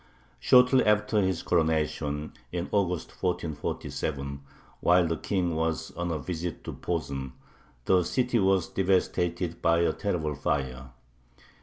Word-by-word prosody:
Shortly 125 +1 +6
after 105 0 +3
his 95 -3 0
coronation, 75 -3 0 0.2
in 90 0 -3
August, 90 -5 0
1447, 70 -4 -3 0.4
while 90 0 +4
the 85 0 0
King 90 0 -1
was 80 0 -1
on 85 +1 -3
a 80 - -1
visit 85 +4 -5
to - - -6
Posen, 70 -6 -3 0.5
the 95 -1 +4
city 125 +6 +1
was 95 -3 +3
devastated 90 -2 0
by 85 0 +3
a 85 -2 +2
terrible 80 -7 -2
fire. 65 -2 -2
85 Hz, 125 wpm, -28 LUFS, 75-95 Hz, 0.5 s, Shortly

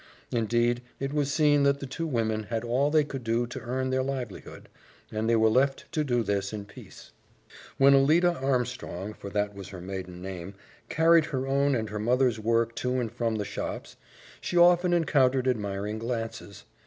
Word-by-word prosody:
Indeed, 120 +1 +1 0.2
it 135 +1 -3
was 145 -2 0
seen 145 +1 +3
that 140 0 +3
the 140 - -5
two 165 +5 -4
women 110 -5 -1
had 115 +1 -3
all 125 +5 +1
they 155 0 +4
could 135 -3 -7
do 115 +1 0
to 120 - -7
earn 130 +2 -2
their 130 0 +1
livelihood, 130 -6 -6 0.4
and 110 +1 -1
they 115 - +4
were 110 0 +4
left 135 +4 +1
to 155 -2 0
do 120 -4 0
this 100 -2 -1
in 105 -2 -6
peace. 100 - -14 0.7
When 135 +1 +6
Alida 160 +6 +4
Armstrong 125 - -2
for 100 - -9
that 105 0 -1
was 100 -2 -9
her 95 - -9
maiden 90 -1 -7
name 95 0 -7 0.3
carried 165 0 +4
her 135 -3 -3
own 140 +1 +2
and 110 -3 -3
her 105 - -4
mother's 120 +1 +2
work 115 +1 +1
to 125 0 -1
and 115 -3 -3
from 115 -2 -1
the 105 -1 -2
shops, - - -6 0.5
she 175 - -2
often 175 +1 +5
encountered 135 -6 +2
admiring 105 -3 -2
glances. 115 -1 -5
120 Hz, 185 wpm, -27 LUFS, 110-140 Hz, 0.7 s, When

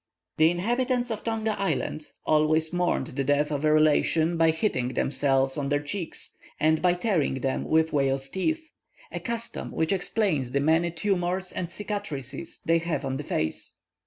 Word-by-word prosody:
The 160 +1 +6
inhabitants 245 +7 0
of 215 - -4
Tonga 225 -1 -1
Island 155 -5 -1 0.2
always 155 +1 +3
mourned 175 -6 +1
the 135 +2 -2
death 145 +2 +2
of 145 0 -2
a 155 - +4
relation, 155 +2 +3
by 165 -1 +4
hitting 160 - 0
themselves 135 +1 +1
on 140 -1 -2
their 145 0 +2
cheeks, 160 +4 -4 0.2
and 155 0 +3
by 180 -1 +3
tearing 180 - +1
them 135 0 -1
with 160 0 +2
whale's 135 -1 +1
teeth, 315 - -2 0.4
a - - -4
custom 235 -1 -5
which 160 +3 0
explains 180 - 0
the 140 - +2
many 160 +4 +3
tumours 180 +1 -1
and 175 - -4
cicatrices 190 - -5
they 165 0 +4
have 165 -3 -2
on 135 0 -2
the 145 - -5
face. 80 - -3
160 Hz, 165 wpm, -27 LUFS, 145-190 Hz, 0.4 s, The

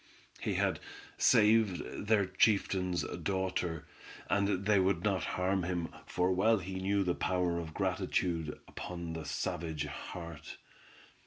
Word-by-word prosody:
He - - -1
had - - +1 0.4
saved 105 -2 +3
their 105 -2 +4
chieftain's 95 -2 +2 0.2
daughter, 95 -4 -1 0.5
and 100 -1 +1
they 105 -2 +4
would 95 +1 +2
not 95 -4 +1
harm 95 +1 +1
him, 85 -2 -2 0.2
for 90 +1 +1
well 110 +5 +4
he 95 0 -5
knew 100 +1 +2
the 90 -2 +1
power 90 -2 0
of 80 -2 -7
gratitude 80 -4 -1
upon 85 -2 -6
the 80 -1 -5
savage 80 +1 -2
heart. 85 -4 -7
90 Hz, 130 wpm, -32 LUFS, 85-100 Hz, 0.5 s, their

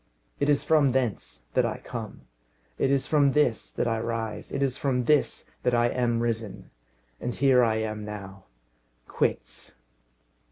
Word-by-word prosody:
It 140 - +1
is 145 - +3
from 150 -5 +4
thence 125 - -1
that - - +3
I - - -1
come; - - -7 0.6
it 135 - +2
is 140 -1 +2
from 140 -3 +3
this 150 -7 +1
that - - -1
I 115 -1 0
rise; 115 -1 -4
it 140 - 0
is 130 -2 0
from 130 -3 0
this 150 0 +1
that 125 -1 +2
I 120 0 +3
am 120 -2 0
risen. 115 -3 -3 0.5
And 125 -1 -3
here 130 -2 +4
I 110 -2 +2
am 110 -1 -3
now. 100 -2 -8 0.6
Quits!" - - -2
120 Hz, 160 wpm, -27 LUFS, 110-135 Hz, 0.6 s, from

